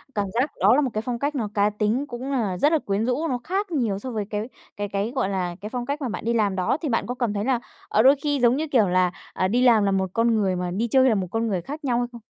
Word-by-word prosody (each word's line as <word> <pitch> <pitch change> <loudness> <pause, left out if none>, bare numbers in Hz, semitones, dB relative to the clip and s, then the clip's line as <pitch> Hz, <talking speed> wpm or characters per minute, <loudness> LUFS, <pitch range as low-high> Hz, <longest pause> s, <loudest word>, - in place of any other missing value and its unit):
Cảm 205 - 0
giác 255 +5 0
đó - - +5
là 295 - +3
một 265 - 0
cái 215 - -1
phong 240 0 -4
cách 285 +2 -1
nó 220 -5 -2
cá 205 0 +3
tính 215 +6 0
cũng 255 +3 -5
là 210 -9 -1
rất 295 - +3
là 320 - +3
quyến 200 0 -1
rũ, 290 +6 0
nó 250 - -1
khác 390 +2 -2
nhiều 225 -10 0
so 255 - -6
với 215 -3 -2
cái 210 +3 -3 0.3
cái 205 0 -2
cái, 200 +3 -2
gọi 195 - 0
là, 180 -3 -2
cái 210 - -5
phong 245 0 -4
cách 285 +2 -3
mà 255 - -2
bạn 215 - -5
đi 235 - +1
làm 205 -4 +1
đó, 185 +9 0
thì 305 - -2
bạn 230 - 0
có 245 - -3
cảm 240 -4 -1
thấy 205 +2 -2
là, 260 -3 +1 0.3
ờ, 215 - +3
đôi 270 +4 +7
khi 290 -2 0
giống 240 +1 +4
như 315 +1 -2
kiểu 235 -8 +3
là, 180 0 +2 0.2
ờ, 185 - 0
đi 235 +6 +1
làm 235 -4 +5
là 200 - +2
một 190 -1 0
con 230 0 +2
người 195 -4 +1
mà 180 0 -3
đi 225 +6 -1
chơi 260 +2 +4
là 220 - +3
một 185 -2 -1
con 225 0 0
người 190 -5 -1
khác 295 - -8
nhau 250 -4 +1
hay 245 - -1
không? 235 -2 -11
230 Hz, 320 wpm, -24 LUFS, 205-260 Hz, 0.3 s, đôi